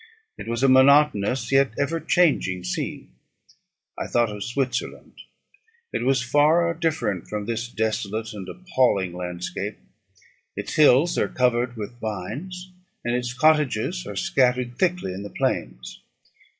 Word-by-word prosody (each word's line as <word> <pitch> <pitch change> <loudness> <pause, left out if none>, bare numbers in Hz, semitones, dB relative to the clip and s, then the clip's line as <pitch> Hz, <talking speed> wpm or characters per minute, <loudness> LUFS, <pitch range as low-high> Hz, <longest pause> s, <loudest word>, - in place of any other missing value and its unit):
It - - -9
was 115 +2 -2
a - - +6
monotonous 130 -3 +4
yet 135 -4 +3
ever 155 +4 0
changing 150 - +1
scene. 90 -7 -4 0.8
I - - -4
thought 120 -2 +1
of 105 -1 -5
Switzerland; 125 -1 -3 0.8
it - - -1
was 130 -1 +2
far 155 +6 +3
different 155 - -2
from 105 -1 -4
this 115 +1 -3
desolate 110 -1 -2
and 95 -3 -8
appalling 130 - 0
landscape. 90 0 -5 0.8
Its - - -5
hills 150 +2 +4
are - - +1
covered 125 -1 0
with 110 +3 -7
vines, 145 - -6 0.3
and 120 0 0
its 125 0 -2
cottages 155 - +2
are - - -6
scattered 125 -1 +1
thickly 180 - 0
in 95 - -6
the 100 - -7
plains. - - -3
125 Hz, 135 wpm, -24 LUFS, 105-150 Hz, 0.8 s, a